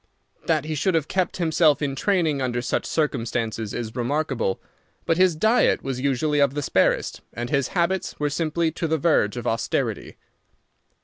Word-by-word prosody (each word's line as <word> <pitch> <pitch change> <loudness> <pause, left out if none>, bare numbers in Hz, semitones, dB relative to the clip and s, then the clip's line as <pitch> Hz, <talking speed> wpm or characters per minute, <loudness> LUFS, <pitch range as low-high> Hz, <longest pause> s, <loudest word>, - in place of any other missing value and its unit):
That - - +1
he 155 - -3
should 165 +5 0
have 155 -2 +1
kept 185 -1 -1
himself 160 -3 +3
in 140 -2 -1
training 160 -5 +1
under 120 -2 -1
such 120 - -2
circumstances 115 -7 -2
is 115 -2 -5
remarkable, 130 -5 -1 0.5
but 165 - +1
his 185 -2 +4
diet 220 +9 +3
was 130 -1 -3
usually 145 +2 +1
of 140 -1 +3
the 145 - -2
sparest, - - +1
and 120 +2 -5
his 140 -3 +1
habits 190 +2 0
were 145 -1 0
simple 160 +2 0
to 165 +1 -3
the 160 0 +1
verge 135 -8 +2
of 120 - -5
austerity. 115 0 -2
150 Hz, 170 wpm, -24 LUFS, 125-165 Hz, 0.5 s, his